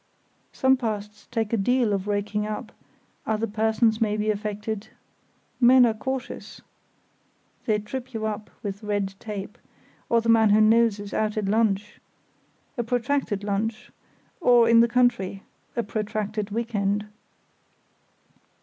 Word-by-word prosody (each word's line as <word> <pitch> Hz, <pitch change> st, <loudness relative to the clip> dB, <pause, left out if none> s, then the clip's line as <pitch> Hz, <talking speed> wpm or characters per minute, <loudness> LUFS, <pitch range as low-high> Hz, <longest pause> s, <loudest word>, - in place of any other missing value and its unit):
Some 265 Hz, -1 st, +3 dB
pasts 210 Hz, -4 st, -5 dB
take 225 Hz, -2 st, -2 dB
a -, -, +3 dB
deal 235 Hz, +1 st, +2 dB
of 195 Hz, 0 st, -2 dB
raking 205 Hz, +1 st, -1 dB
up—other 215 Hz, +1 st, -6 dB
persons 220 Hz, +1 st, +1 dB
may 210 Hz, -1 st, +1 dB
be 215 Hz, 0 st, +1 dB
affected; 210 Hz, 0 st, -4 dB, 0.7 s
men 250 Hz, 0 st, +7 dB
are 230 Hz, -, +2 dB
cautious, 265 Hz, +4 st, -5 dB, 1.1 s
they 215 Hz, -2 st, +3 dB
trip 250 Hz, +5 st, -6 dB
you 220 Hz, -2 st, -3 dB
up 215 Hz, -1 st, -4 dB
with 200 Hz, -1 st, -4 dB
red 205 Hz, -2 st, -2 dB
tape; 205 Hz, -2 st, -7 dB, 0.5 s
or 235 Hz, -, +4 dB
the 230 Hz, -, -4 dB
man 225 Hz, -1 st, +5 dB
who 210 Hz, +1 st, +5 dB
knows 220 Hz, -1 st, +4 dB
is 205 Hz, -1 st, -7 dB
out 215 Hz, 0 st, -1 dB
at 210 Hz, -, 0 dB
lunch—a 210 Hz, +3 st, -3 dB
protracted 245 Hz, -3 st, -1 dB
lunch; 210 Hz, +2 st, -2 dB, 0.5 s
or 245 Hz, -8 st, +5 dB
in 230 Hz, 0 st, +6 dB
the 235 Hz, -, +6 dB
country—a 235 Hz, -2 st, -1 dB
protracted 215 Hz, 0 st, -3 dB
week 230 Hz, +2 st, -3 dB
end. 205 Hz, 0 st, 0 dB
215 Hz, 130 wpm, -25 LUFS, 205-230 Hz, 1.1 s, men